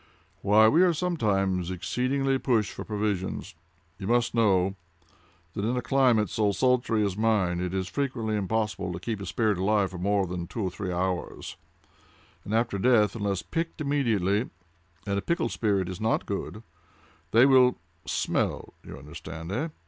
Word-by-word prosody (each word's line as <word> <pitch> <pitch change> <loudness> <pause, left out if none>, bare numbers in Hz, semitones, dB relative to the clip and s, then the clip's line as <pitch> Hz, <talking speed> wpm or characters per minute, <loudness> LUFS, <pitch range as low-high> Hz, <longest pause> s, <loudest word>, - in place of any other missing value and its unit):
"Why, 105 +2 +5
we 155 +10 +4
are 180 -2 +4
sometimes 95 - 0
exceedingly 130 +9 0
pushed 115 -7 +1
for - - -7
provisions. 105 -3 -3 0.5
You 95 - -5
must 120 +1 +2
know 95 -4 +2 0.8
that, 100 - -3
in 120 +4 0
a - - 0
climate 120 -4 +3
so 105 -2 0
sultry 120 -3 +2
as 100 -2 -2
mine, 105 -5 +1
it 90 -1 -2
is 95 -1 -2
frequently 115 -1 -2
impossible 105 -1 -1
to 85 - -5
keep 105 +2 -4
a 100 - -6
spirit 105 -2 0
alive 100 -1 +2
for 90 - -7
more 100 +1 +1
than 90 -1 -5
two 110 +4 -4
or 95 - -1
three 95 0 -4
hours; 90 0 -3 0.9
and - - -7
after 115 -2 0
death, 110 -1 +3
unless 100 -4 -2
pickled 165 0 -3
immediately 115 -8 +1 0.6
(and 100 0 0
a - - -4
pickled 170 -5 -1
spirit 100 -5 0
is 90 +1 -6
not 110 +1 +1
good), 105 +2 -5 0.7
they 115 +7 +6
will—smell—you 125 - 0
understand, 80 +3 -8
eh? 145 +10 -1
105 Hz, 155 wpm, -27 LUFS, 95-120 Hz, 0.9 s, they